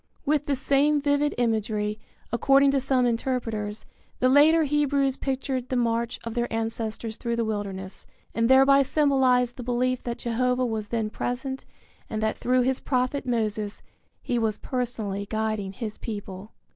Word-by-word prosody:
With 295 0 +1
the 285 - +1
same 280 +3 +2
vivid 290 +1 +1
imagery, 215 -2 0 0.3
according 275 +3 +4
to 275 - +2
some 260 -1 +2
interpreters, 230 -3 -2 0.3
the 255 - +3
later 310 +4 +6
Hebrews 285 -2 +1
pictured 265 -2 -3
the 255 - -1
march 235 0 0
of 230 - -5
their 240 0 -1
ancestors 225 0 -2
through 235 -1 -2
the 230 -1 0
wilderness, 195 -3 -4 0.3
and 230 +1 +1
thereby 270 +1 +6
symbolized 260 -4 +2
the - - -5
belief 250 +1 0
that 235 -1 -4
Jehovah 250 +2 0
was 220 -3 -3
then 220 -1 -2
present 265 +3 -4 0.4
and 220 - -3
that 220 - +1
through 255 +1 +2
his 260 +1 0
prophet 255 +1 -1
Moses 215 -3 -1 0.4
he 240 - 0
was 220 -2 0
personally 220 -6 -3
guiding 215 -3 -2
his 215 +1 -6
people. 205 -2 -7
245 Hz, 155 wpm, -26 LUFS, 220-265 Hz, 0.4 s, later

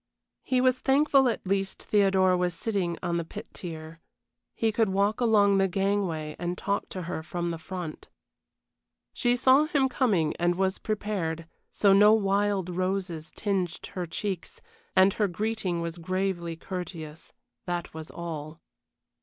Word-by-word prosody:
He 255 -1 +1
was 255 0 +3
thankful 275 -1 +4
at 230 - -3
least 195 0 -1
Theodora 190 -3 +3
was 180 -1 0
sitting 180 -3 -1
on 170 0 0
the 170 - -1
pit 160 - -9
tier 160 -1 -8 0.5
he 225 -1 +1
could 220 -1 +2
walk 200 +4 +1
along 205 -4 +4
the 195 - +4
gangway 190 -5 -1
and 175 +1 -2
talk 200 0 -2
to 185 - -5
her 165 -1 -4
from 175 +1 -3
the 165 - -5
front. 170 -1 -7 1.0
She 245 0 +2
saw 260 +4 +5
him 290 -4 +2
coming 200 - +1
and 175 0 +2
was 190 +1 0
prepared, 195 -7 -2 0.3
so 200 -2 +4
no 210 +2 +7
wild 200 -2 +1
roses 180 -3 -2
tinged 190 -5 -2
her 180 -3 -3
cheeks, 190 +1 -4 0.4
and 190 +1 +6
her 210 - +1
greeting 195 -2 -2
was 170 0 -4
gravely 185 -1 -2
courteous, 165 -3 -7 0.4
that 175 -1 -3
was 160 0 -8
all. 160 -2 -6
190 Hz, 150 wpm, -27 LUFS, 170-205 Hz, 1.0 s, no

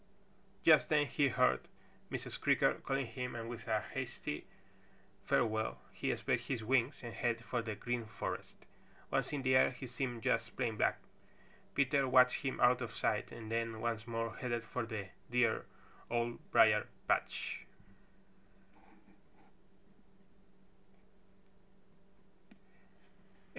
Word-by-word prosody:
Just - - +6
then 150 -1 +4
he 145 0 +2
heard 125 -1 +2 0.4
Mrs. - - -5
Creaker - - +4
calling 135 0 -2
him 125 +2 -5
and 115 -1 -4
with 120 -1 -7
a - - +2
hasty 75 - -5 0.8
farewell 110 -1 +1
he - - -1
spread - - 0
his 125 -5 -3
wings 130 +4 +1
and 120 -1 -6
headed 115 -1 -1
for 120 - -1
the 110 -2 -4
Green 120 +1 -3
Forest. 110 - -5 0.6
Once - - 0
in 140 -2 -2
the 130 0 +4
air 130 - +6
he 130 +1 -8
seemed 125 -2 -4
just 115 0 0
plain 120 -4 0
black. - - +2 0.8
Peter 140 0 +3
watched 125 0 +5
him 135 -2 -2
out 125 +1 +5
of 120 - -5
sight - - 0
and 110 -1 -8
then 115 -1 -1
once 115 -1 -2
more 115 0 -2
headed 120 -3 -2
for 120 0 -4
the 105 -4 -5 0.2
dear 120 -2 +2 0.4
Old 120 0 -1
Briar - - +5 0.2
patch. - - -1
120 Hz, 125 wpm, -35 LUFS, 115-130 Hz, 0.8 s, Just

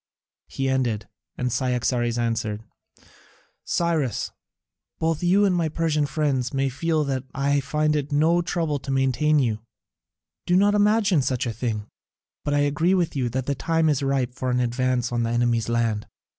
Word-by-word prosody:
He 135 - -3
ended, 120 -6 0 0.3
and 125 0 -1
Cyaxares 125 -1 0
answered: 115 -2 -2 1.0
"Cyrus, 160 -9 -1 0.7
both 160 -1 0
you 190 +4 +4
and 195 - +2
all - - +1
my 165 -2 0
Persian 155 -2 0
friends 135 -4 0
may 135 0 +1
feel 155 +4 0
sure 140 - -1
that 130 0 -3
I 140 +1 +2
find 150 +2 0
it 145 0 -2
no 160 +4 +3
trouble 165 -3 -1
to 135 - -10
maintain 135 +3 +2
you; 115 -6 +1 0.9
do 180 - +3
not 205 +2 +4
imagine 205 -5 +3
such 130 -1 -1
a 115 - -2
thing; 110 -2 -3 0.6
but 145 - 0
I 145 - +3
agree 150 +6 +2
with 170 -4 0
you 125 -3 0
that 130 +2 -3
the 140 - 0
time 165 +3 +1
is 145 -2 +1
ripe 135 -3 0
for 130 0 -3
an 125 0 +1
advance 125 0 0
on 120 -1 0
the 115 - 0
enemy's 120 -1 +1
land." 115 -3 0
135 Hz, 175 wpm, -24 LUFS, 125-155 Hz, 1.0 s, you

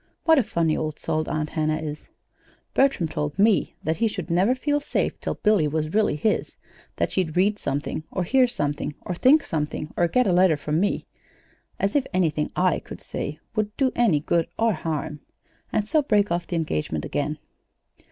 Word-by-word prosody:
(What 320 -3 +5
a - - +3
funny 165 -5 0
old 155 -1 -3
soul 155 0 -2
Aunt 155 -1 -2
Hannah 155 -1 0
is!) 155 -1 -6 0.6
Bertram 270 -11 +3
told 150 0 -3
me 210 0 +3
that 160 +1 0
he 230 - +2
should 185 -5 -5
never 190 +9 +3
feel 290 +3 0
safe 290 - -2
till - - -3
Billy 210 -8 +3
was 155 +1 -2
really 215 -5 +2
his; 210 +8 -1 0.4
that - - -1
she'd 175 -4 -1
read 205 +3 +3
something, 145 +2 -3
or 185 - -2
hear 255 +7 +4
something, 145 -8 -2
or 180 - -4
think 275 - +5
something, 150 0 -3
or 175 - +3
get 250 +9 +2
a 185 - +2
letter 180 -3 +4
from 150 +2 -1
me 200 +2 0 0.7
(as 200 +1 0
if 280 -2 +2
anything 155 -4 +1
I 180 -1 +2
could - - -10
say 150 - -5 0.2
would 210 -1 -1
do 265 -2 +2
any 220 -11 +3
good 165 +1 +1
or 225 -1 +3
harm!), 155 -3 -3 0.5
and 210 -1 0
so 310 +6 +3
break 210 -7 +2
the 170 0 -1
engagement 80 - -2
again. 150 +1 -2
175 Hz, 185 wpm, -24 LUFS, 155-215 Hz, 0.7 s, What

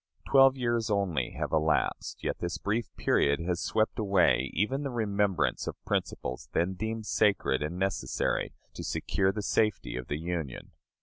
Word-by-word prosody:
Twelve 135 -1 +6
years 120 -3 0
only 95 - 0
have - - -2
elapsed, 80 0 0
yet - - -2
this 85 -1 -2
brief 110 +3 -1
period 70 +2 +2
has 85 0 -1
swept 110 +1 0
away 100 -4 +3
even 120 - 0
the 140 - -2
remembrance 100 - 0
of - - -3
principles 65 0 -3
then 90 +3 +1
deemed 110 +3 -4
sacred 100 -12 +2
and 75 +4 -3
necessary 95 -1 -1 0.2
to - - -7
secure 95 -1 0
the 105 +1 -4
safety 105 - 0
of 65 -1 -5
the 75 - -2
Union. 80 -5 -4
95 Hz, 160 wpm, -29 LUFS, 80-110 Hz, 0.2 s, Twelve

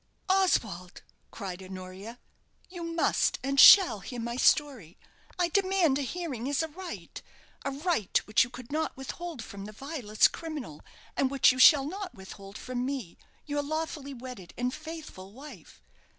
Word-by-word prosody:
"Oswald," 220 - 0 0.3
cried 190 -3 -7
Honoria, 190 +4 -9 0.5
"you 355 -2 -8
must 335 0 +1
and 275 +1 0
shall 260 - +9
hear 245 +5 -7
my 235 +1 -4
story. 255 - +1 0.4
I 350 -1 +1
demand 375 -6 +2
a - - -1
hearing 275 -4 -4
as 285 +2 +1
a 320 - -4
right 355 +3 -8 0.4
a - - -1
right 280 - 0
which 215 +3 +4
you 250 - -6
could 245 0 -11
not 315 -1 -2
withhold 295 0 -6
from 200 -1 -9
the 210 - -8
vilest 245 -3 +1
criminal, 295 - -7 0.3
and 270 - +1
which 275 -1 +5
you 255 - -5
shall 270 +2 +8
not 380 +3 -6
withhold 195 +1 -11
from 250 -1 -4
me, 255 -9 -4 0.3
your 290 -1 -1
lawfully 295 -2 -4
wedded 245 -8 -10
and 250 +1 -1
faithful 310 - -9
wife. 255 - -13
265 Hz, 155 wpm, -29 LUFS, 215-315 Hz, 0.5 s, shall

